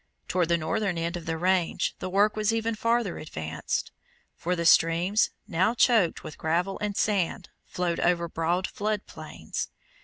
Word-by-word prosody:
Toward 180 -2 +1
the 170 - +4
northern 170 +4 -1
end 170 +1 -2
of 170 -2 -7
the 165 0 -1
range 180 0 +1
the 185 - -4
work 205 +3 +3
was 215 0 +1
even 225 0 0
farther 230 -2 0
advanced, 80 - -4 0.4
for 180 +2 -1
the 170 -1 -2
streams, 170 +5 +4 0.2
now 190 +8 +1
choked 225 -8 +3
with 155 - -9
gravel 175 +5 0
and 210 -1 -2
sand, 200 -5 0 0.2
flowed 175 -2 -1
over 170 -1 +2
broad 170 +3 0
flood 210 0 -2
plains. - - -6
180 Hz, 160 wpm, -27 LUFS, 165-210 Hz, 0.4 s, the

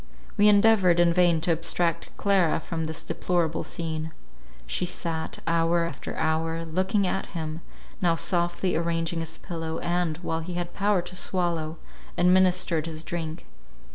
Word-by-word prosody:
We 210 - +5
endeavoured 200 -4 +5
in 170 -1 +5
vain 175 -2 +4
to 170 - +1
abstract 170 +1 0
Clara 190 -6 +2
from 160 0 -4
this 160 0 -5
deplorable 170 -3 -1
scene. 160 -2 -4 0.5
She - - -2
sat, 165 -2 -3
hour 165 +1 +2
after 150 -5 -6
hour, 160 +1 0
looking 190 +5 +1
at 190 - -1
him, 160 0 -4 0.4
now 170 -2 +3
softly 175 +2 0
arranging 165 0 -1
his 160 0 -4
pillow, 165 -2 -5
and, 175 -2 -1
while 160 -1 -1
he 175 +2 -6
had 175 0 -3
power 200 -3 +1
to 180 - -8
swallow, 170 -4 -1 0.4
administered 180 -3 +3
his 160 -1 -5
drink. 165 -2 -5
170 Hz, 145 wpm, -26 LUFS, 160-180 Hz, 0.5 s, We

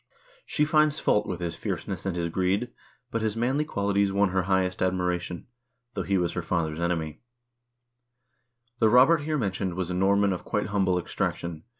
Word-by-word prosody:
She 150 - +1
finds 155 0 +3
fault 105 0 +2
with 90 -2 -4
his 85 -1 -3
fierceness - - -4
and 95 - -1
his 85 -1 -1
greed, 95 +7 0 0.4
but 115 - -1
his 110 0 -1
manly 130 +6 +1
qualities 100 -6 0
won 100 0 +2
her 95 0 +1
highest 95 0 0
admiration, 90 -1 -1 0.5
though 100 - -2
he 95 +1 0
was 85 -2 0
her 90 - -2
father's 80 -2 -2
enemy: 85 -3 -2 1.6
"The 110 - +5
Robert 135 +7 +6
here 155 +1 -1
mentioned 95 -6 -2
was 90 -1 -3
a - - -1
Norman 100 +2 +3
of 90 - -6
quite 105 -1 -2
humble 95 -3 +1
ex 90 - -5
traction. 85 -2 -3
95 Hz, 180 wpm, -27 LUFS, 90-105 Hz, 1.6 s, Robert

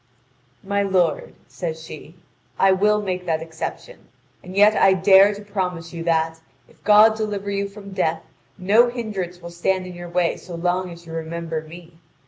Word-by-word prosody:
"My 200 +1 0
lord," 185 -5 0
says 160 -3 -6
she, 160 0 -11 0.4
"I 195 0 +4
will 210 +2 +2
make 180 -2 -4
that 160 -1 0
exception. 165 - -7 0.4
And 185 +1 -10
yet 210 +1 +6
I 195 - +5
dare 195 +2 +6
to 205 - -10
promise 180 -5 -4
you 165 -1 -5
that, 160 -1 0 0.3
if - - -25
God 215 +1 +6
deliver 205 -2 -3
you 200 0 -2
from 200 0 -11
death, 165 -4 -1 0.3
no 215 +6 +4
hindrance 195 -8 -5
will 170 - -8
stand 185 +2 -1
in 180 - -8
your 175 0 -9
way 175 -1 0
so 175 - -9
long 180 +2 -1
as 170 0 -12
you 165 - -10
remember 165 0 -4
me. 165 +1 -14
180 Hz, 175 wpm, -22 LUFS, 170-200 Hz, 0.4 s, yet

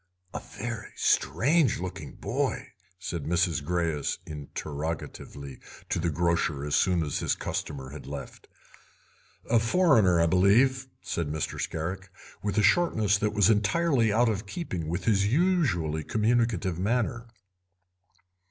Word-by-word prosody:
"A - - -3
very 110 0 -7
strange 130 - +2
looking 85 -6 -6
boy?" 130 0 -2 0.3
said 85 -5 -5
Mrs. 85 -1 +1
Greyes 80 -2 -1
interrogatively 75 -2 -6 0.3
to - - 0
the 85 0 0
grocer 85 -3 0
as 75 - 0
soon 90 -3 +2
as 75 - -2
his - - 0
customer 65 -2 -5
had 70 -2 -9
left. 70 -1 -8 1.0
"A 115 0 +4
foreigner, 115 - +4
I 85 - +4
believe," 115 +10 +3 0.2
said 85 -3 -2
Mr. 75 +1 -3
Scarrick, 95 +4 -4 0.3
with 100 0 -2
a 105 - +4
shortness 105 - +3
that 105 0 -1
was 105 +1 +5
entirely 115 +2 +2
out 120 +4 +3
of 105 -1 -2
keeping 95 - -4
with 85 +3 -3
his 100 -3 +3
usually 120 - +1
communicative 110 -3 0
manner. 120 +3 -1
95 Hz, 130 wpm, -27 LUFS, 80-115 Hz, 1.0 s, was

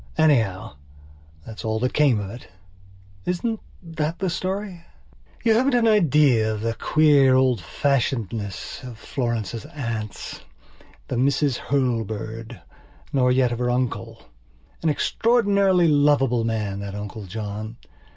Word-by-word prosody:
Anyhow, 110 - +2 0.7
that 110 -1 -10
is - - -6
all 110 0 -1
that 125 - 0
came 140 -7 +3
of 100 -1 -5
it. 120 +2 -11 0.8
Isn't 220 +5 -1 0.2
that 165 +1 -3
a 185 - +1
story? 185 0 -4 0.6
You 225 -2 +4
haven't 250 +3 +3
an 235 -2 +3
idea 150 - +4
of 105 -1 -4
the 115 0 -1
queer 145 -2 +4
old 130 -5 +3
fashionedness 115 -4 -2
of 125 -3 -8
Florence's 115 -3 -3
auntsthe 115 -7 -5 0.7
Misses 135 +1 +1
Hurlbird, 115 -4 -2 0.5
nor 125 -2 +3
yet 125 -1 +3
of 120 - -3
her 125 0 0
uncle. 115 -2 -2 0.6
An 165 - +1
extraordinarily 200 -1 +3
lovable 145 -5 +3
man, 105 -3 -2
that 100 0 -6
Uncle 105 0 -7
John. 110 +2 -6
125 Hz, 125 wpm, -23 LUFS, 110-150 Hz, 0.8 s, You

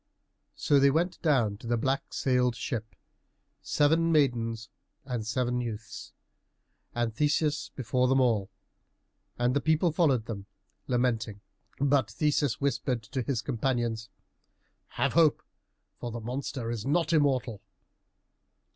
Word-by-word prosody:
So 145 - +3
they 140 0 +6
went 170 +5 0
down 120 -10 +2
to 115 - -10
the 120 0 +1
black 135 +4 -1
sailed 125 -2 +1
ship, 115 -3 -4 0.7
seven 165 +3 +2
maidens 115 -7 +1 0.4
and 120 -5 -4
seven 125 +1 0
youths, 115 -1 -7 0.8
and 120 -2 0
Theseus 150 +3 0
before 125 0 +1
them 135 +1 +3
all. 110 -6 +2 0.9
And 120 +2 +1
the 140 - +2
people 160 +3 +2
followed 140 -8 +2
them, 100 -4 -6 0.4
lamenting. 115 -5 0 0.4
But 140 -5 +2
Theseus 145 -1 0
whispered 130 -3 -1
to 130 +5 -3
his 120 -3 -2
companions, 120 -3 -1 0.8
"Have - - -1
hope, 160 -3 +4 0.6
for 120 - -4
the 115 0 -5
monster 125 +1 -4
is 115 -3 -4
not 160 +4 +1
immortal." 130 -8 +1
125 Hz, 125 wpm, -29 LUFS, 115-145 Hz, 0.9 s, they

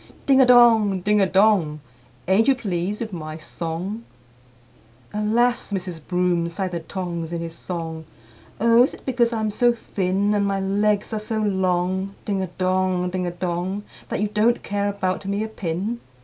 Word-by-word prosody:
Ding 270 -1 +5
a 255 - +5
dong, 225 -6 +6
ding 210 +2 +2
a 195 - +4
dong! 190 -7 +3 0.5
Ain't 195 +5 +3
you 270 - +5
pleased 200 -3 -3
with 220 -3 -4
my 155 -2 -6
song?" 170 +7 -5 1.1
III. 210 - -2
"Alas! 235 +2 +1
Mrs. 180 -4 -4
Broom," 180 -2 +1
sighed 185 +2 -3
the 170 - -3
Tongs 170 -1 -5
in 170 - -2
his 165 -1 -5
song, 165 -2 -5 0.5
"Oh! 230 +2 +5
is 255 - +2
it - - -18
because 245 -3 +2
I'm 220 -2 -1
so 240 +3 +3
thin, 200 -2 -1
And 200 -1 +1
my 195 -1 0
legs 205 +2 0
are 215 - -1
so 220 +1 -3
long,—ding 190 0 -1
a 190 - -2
dong, 185 0 0
ding 180 -1 -2
a - - -2
dong!— 180 +3 -3 0.3
That - - -2
you 210 - +2
don't 220 +3 +2
care 200 0 -1
about 195 -1 -2
me 200 +2 -1
a - - -3
pin? 205 +2 -3
195 Hz, 175 wpm, -23 LUFS, 180-215 Hz, 1.1 s, dong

